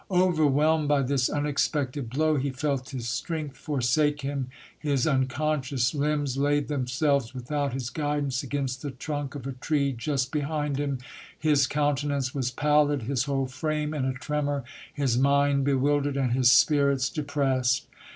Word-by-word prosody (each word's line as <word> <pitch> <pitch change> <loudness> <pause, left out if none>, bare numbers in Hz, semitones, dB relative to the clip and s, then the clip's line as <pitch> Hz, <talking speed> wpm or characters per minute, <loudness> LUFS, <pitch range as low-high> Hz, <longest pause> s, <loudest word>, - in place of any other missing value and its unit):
Overwhelmed 160 -4 +3
by 145 -1 +3
this 130 -1 +1
unexpected 145 -3 -1
blow, 155 +5 +1
he 140 0 0
felt 135 0 -2
his 125 -4 -5
strength 150 +3 -3
forsake 145 +1 0
him. 140 -2 -3 0.3
His 140 -4 0
unconscious 135 -2 0
limbs 145 -2 0
laid 145 +1 +1
themselves 135 -1 0
without 140 +2 -2
his 130 -2 -4
guidance 145 -2 -1
against 135 -2 -3
the 145 - -4
trunk 145 +1 -5
of 135 -3 -7
a 135 - -3
tree 140 +2 0
just 130 +1 -2
behind 150 -1 -1
him. 140 -2 -1 0.4
His 150 -4 +3
coun 145 0 +1
tenance 140 -3 -2
was 130 -3 -1
pallid, 145 0 +2
his 130 +1 0
whole 135 -2 0
frame 150 +3 -2
in 140 -4 -1
a 130 - 0
tremor, 145 +1 -2 0.3
his 130 -4 0
mind 140 0 +3
bewildered 140 +1 +1
and 130 -3 +1
his 125 0 +5
spirits 140 0 +4
depressed. 135 -4 0
140 Hz, 150 wpm, -27 LUFS, 130-150 Hz, 0.4 s, his